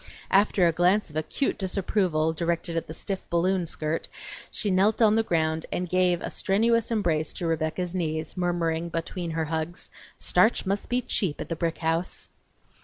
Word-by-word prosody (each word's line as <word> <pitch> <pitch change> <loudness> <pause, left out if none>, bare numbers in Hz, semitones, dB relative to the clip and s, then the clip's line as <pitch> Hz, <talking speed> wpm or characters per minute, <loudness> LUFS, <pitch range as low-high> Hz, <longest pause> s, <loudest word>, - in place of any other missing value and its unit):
After 195 -2 +4
a - - +4
glance 180 +3 +2
of - - -14
acute 155 - -1
disapproval 185 -4 0
directed 170 +1 -2
at 165 - -2
the - - -7
stiff 190 +2 -3
balloon 180 +1 +1
skirt 155 +1 -2 0.4
she 205 - -1
knelt 200 +4 +3
on 220 -2 +5
the 225 - +4
ground 160 -5 0
and 180 - -2
gave 180 -1 +2
a - - -4
strenuous 230 +3 +2
embrace 170 -9 +1
to 175 - -4
Rebecca's 165 +2 -1
knees, 160 -3 -2
murmuring, 170 -2 0
between 170 +1 -4
her 160 0 -1
hugs, 160 +2 -4 0.3
"Starch 210 +6 +3
must 195 +1 -2
be 245 +1 +1
cheap 175 -10 0
at - - -5
the 165 - -1
brick 165 0 -1
house!" 165 +2 -1
175 Hz, 175 wpm, -26 LUFS, 160-195 Hz, 0.4 s, on